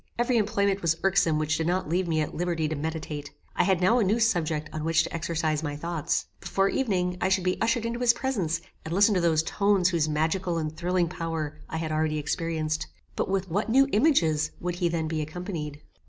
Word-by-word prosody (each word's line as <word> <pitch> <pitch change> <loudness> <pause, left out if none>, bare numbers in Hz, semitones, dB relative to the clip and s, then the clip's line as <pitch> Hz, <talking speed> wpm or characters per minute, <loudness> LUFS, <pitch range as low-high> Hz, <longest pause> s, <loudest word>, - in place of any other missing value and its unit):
Every 240 +1 +2
employment 200 -2 +1
was 165 -1 +1
irksome 185 -5 +3
which 155 0 0
did 160 - -1
not 180 0 0
leave 175 +3 0
me 160 -2 +1
at 150 - -3
liberty 170 -2 -1
to 155 - -2
meditate. 150 -1 -4 0.3
I - - +3
had 190 -2 +2
now 225 +7 +4
a - - +3
new 205 +4 +2
subject 165 -9 +1
on 155 - -4
which 165 0 +3
to - - -6
exercise 160 -2 -1
my 145 -2 -3
thoughts. 165 +1 -2
Before 195 0 +1
evening 180 -8 0
I 185 - +2
should 190 -1 +2
be 180 0 -1
ushered 230 +1 +1
into 235 +1 -2
his 245 -1 +5
presence, 200 -11 -1 0.2
and 165 +2 -4
listen 205 +2 +5
to 185 - +2
those 160 -2 +3
tones 200 0 +2
whose 165 -4 +1
magical 165 +3 0
and 155 -1 -3
thrilling 175 +1 +1
power 160 -3 -4
I 160 - -3
had 160 -1 -3
already 155 0 0
experienced. 155 0 -2 0.3
But - - -1
with 190 -2 -1
what 205 +6 0
new 270 +4 +5
images 165 - +3
would 175 0 -3
he 175 -1 +1
then 165 -1 -1
be 155 0 -2
accompanied? 155 -2 -5
170 Hz, 215 wpm, -27 LUFS, 155-195 Hz, 0.3 s, his